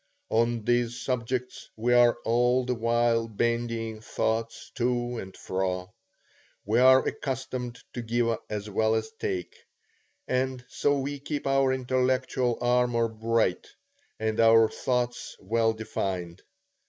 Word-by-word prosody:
On 115 0 +1
these 120 0 +1
subjects 125 0 -3
we 120 +3 +1
are 120 -1 +5
all 125 +2 +2
the 125 - 0
while 115 0 +1
bandying 115 0 -2
thoughts 115 +1 -2
to 120 -1 -1
and 95 0 -9
fro; 95 +1 -3 0.7
we 110 +4 +2
are 130 +1 +6
accustomed 130 -3 -4 0.2
to 120 - -4
give 115 0 0
as 105 -1 -4
well 110 +2 +1
as 110 0 -2
take; 90 -2 -3 0.7
and 130 0 -1
so 145 0 +1
we 140 +1 -3
keep 145 +1 -4
our 135 -1 +3
intellectual 130 -1 0
armor 120 -1 +2
bright, 110 -3 0 0.5
and 110 0 -1
our 115 0 +6
thoughts 125 -1 -2
well 115 +3 +1
defined. 95 -5 -4
120 Hz, 125 wpm, -27 LUFS, 110-125 Hz, 0.7 s, are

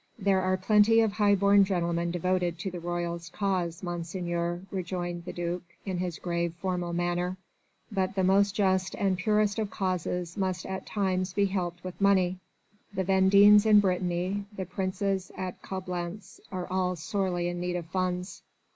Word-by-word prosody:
"There 195 -3 +2
are 185 0 +1
plenty 210 +3 +5
of 220 -2 +2
high 205 -1 +3
born 200 +1 +5
gentlemen 170 -3 0
devoted 175 0 0
to 185 +3 -4
the 175 - -6
royalist 170 0 -4
cause, 185 -4 -1
Monseigneur," 175 0 -3
rejoined 175 -2 -4
the - - -4
duc 175 0 -3 0.2
in 185 -3 -2
his 180 -2 -3
grave, 170 -1 -2
formal 180 -2 -2
manner. 175 +1 -1 0.5
"But 190 -1 -1
the 190 - +1
most 200 +2 +3
just 190 -2 +1
and 195 -2 +1
purest 210 +2 +1
of 215 -2 -1
causes 180 -3 -2
must 185 -3 -1
at 190 0 -5
times 185 -3 -1
be 200 +1 +2
helped 180 -3 -3
with 185 +1 -7
money. 185 -2 +3 0.5
The 190 -2 -2
Vendéens 200 +2 +6
in 210 -1 +8
Brittany, 185 +1 0
the 190 - -3
Princes 190 +1 -2
at 185 -1 -5
Coblentz 180 +1 -6
are 185 -2 -3
all 185 0 0
sorely 175 +1 -1
in 175 0 -3
need 180 0 -2
of 175 -2 -3
funds...." 180 +1 -3
185 Hz, 165 wpm, -28 LUFS, 175-195 Hz, 0.5 s, in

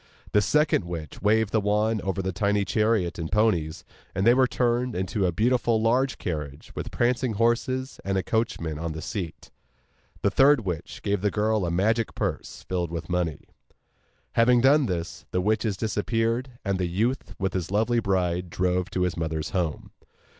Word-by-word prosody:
The 105 - +4
second 150 - +2
witch 80 -4 -7
waved 110 +1 +2
the 110 - +2
wand 105 +1 +1
over 95 0 -2
the 95 - -1
tiny 100 +2 +1
chariot 105 -5 +1
and 80 -1 -4
ponies, 90 -8 +1 0.3
and 95 +1 0
they 120 - +7
were 130 0 +4
turned 125 -1 0
into 95 +2 0
a - - +1
beautiful 115 +3 +2
large 125 +4 +2
carriage 75 -5 -5
with - - -5
prancing 120 0 0
horses, 120 +4 0
and 95 0 -1
a 95 - 0
coachman 85 -9 -1
on 85 -1 -3
the 80 - -6
seat. 90 -5 -6 0.7
The 100 - +3
third 135 +3 +5
witch 90 -6 -5
gave 100 -2 0
the 105 - +2
girl 105 -2 +1
a - - 0
magic 110 +6 +1
purse, - - -4
filled 90 -2 -1
with 85 0 -5
money. 85 -4 -1 0.9
Having 120 +1 +4
done 140 +1 +5
this, 85 -3 -4
the 90 - 0
witches 105 +1 0
disappeared, 115 +3 -1 0.2
and 100 -1 0
the 90 - 0
youth 115 +9 -1
with 95 0 -1
his 90 -3 -2
lovely 110 +4 +2
bride 90 -4 0
drove 90 +1 0
to 90 - -2
his 90 -1 0
mother's 80 -2 -3
home. 85 -5 -2
100 Hz, 175 wpm, -26 LUFS, 90-115 Hz, 0.9 s, they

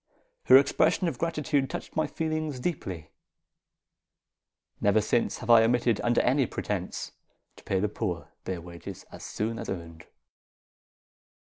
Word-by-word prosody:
Her 130 - +9
expressions 155 +6 +3
of - - -7
gratitude 150 -4 0
touched - - -6
my 155 - +1
feelings 155 -4 -2
deeply. 95 - -4 1.7
Never 100 +1 +4
since 110 +3 0
have 120 -1 -1
I 115 -1 +9
omitted, 120 -1 +2
under 120 0 +3
any 130 0 +2
pretence, - - -4 0.5
to - - -15
pay 95 - 0
the 105 - +1
poor 100 -5 -4
their 90 -2 -3
wages 85 +2 -9
as - - -10
soon 115 +2 -3
as 115 - -6
earned. 85 -3 -7
115 Hz, 135 wpm, -28 LUFS, 95-140 Hz, 1.7 s, Her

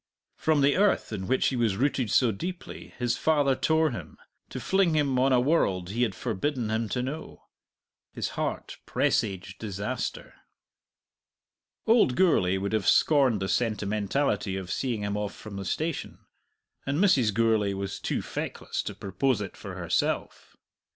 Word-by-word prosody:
From 155 -2 +2
the 140 +3 +3
earth 200 - +2
in 95 -3 -4
which 130 - +2
he 130 - -3
was 115 -5 +1
rooted 130 -3 0
so 120 +2 +4
deeply 175 - -7
his 120 -1 0
father 145 -4 +3
tore 160 +1 +2
him, 120 - -8 0.3
to - - -5
fling 190 -4 +2
him 140 -4 +2
on 135 +1 +3
a 125 - +5
world 100 - +1
he 115 +4 -2
had 110 -6 +1
forbidden 120 +1 -2
him 110 0 -1
to 125 - -1
know. 145 +5 -6 0.7
His - - -3
heart - - -4
presaged 95 -3 0
disaster. 100 -2 -4 1.5
Old 220 - +4
Gourlay 95 - +3
would 100 +2 -3
have 110 -4 0
scorned 130 -10 +4
the - - -1
sentimentality 105 0 0
of 95 -1 -6
seeing 120 -4 -2
him 100 0 -2
off 105 -1 -3
from 105 -2 -9
the 100 - -5
station, 160 - -3 0.6
and 140 +1 -1
Mrs. 140 - +4
Gourlay 110 -2 +2
was 100 0 -4
too - - -2
feckless - - -4
to - - -5
propose 105 +5 0
it 100 -2 -6
for - - -8
herself. - - -2
120 Hz, 155 wpm, -27 LUFS, 100-140 Hz, 1.5 s, a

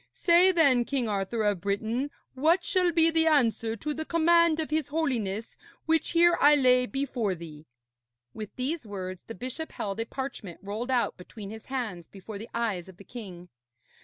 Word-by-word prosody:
Say, 355 +1 +5
then, 280 -9 +4
King 255 -1 -1
Arthur 210 +2 -1
of 205 -4 +1
Britain, 220 +7 -1 0.2
what 325 +7 +2
shall 360 -2 +2
be 330 0 +4
the 325 0 +3
answer 230 -6 +2
to 300 +7 -3
the 315 - -4
command 335 0 +3
of 310 -1 -3
his 310 -2 0
Holiness 235 -9 -2 0.3
which 325 0 +1
here 345 0 +5
I 295 +1 +7
lay 250 -2 +4
before 250 -8 -2
thee.' 160 -2 -11 0.7
With 215 -2 -8
these 265 0 -3
words 185 -2 -6
the 225 - -8
bishop 260 +6 -5
held 200 +1 -4
a 225 - -1
parchment 260 -10 -6
rolled 215 +5 -4
out 250 -2 +1
between 200 +2 -10
his 220 0 -10
hands 220 -11 -4
before 200 +1 -9
the 225 - -9
eyes 205 -7 -2
of 185 - -14
the 200 - -13
king. 185 -7 -10
245 Hz, 180 wpm, -28 LUFS, 205-310 Hz, 0.7 s, I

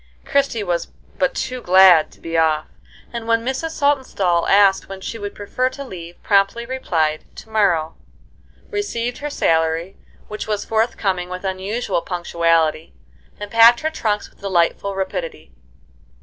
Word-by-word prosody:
Christie 275 -6 0
was 175 -3 -1 0.3
but 275 -1 +1
too 255 -1 -3
glad 180 -5 +6
to - - -20
be 165 0 -6
off; 155 -1 +2 0.5
and 230 -1 -5
when 230 0 +1
Mrs. 265 +5 -2
Saltonstall 255 - +1
asked 195 -1 +4
when 195 0 -7
she 225 +4 -6
would 205 -1 -6
prefer 250 +5 -1
to 270 +2 -8
leave, 175 -8 -10
promptly 200 +3 +2
replied, 165 -12 -1
"To 220 - -12
morrow," 175 -7 +1 0.8
received 245 - -3
her 295 - -4
salary, 165 - 0 0.3
which 215 0 -6
was 210 -1 -2
forthcoming 205 -5 -1
with 185 +1 -6
unusual 190 +1 -2
punctuality, 165 -3 0 0.4
and 205 -1 -7
packed 230 +1 +7
her 315 +1 -1
trunks 210 -9 -2
with - - -29
delightful 195 +1 0
rapidity. 185 - -5
200 Hz, 145 wpm, -20 LUFS, 170-235 Hz, 0.8 s, packed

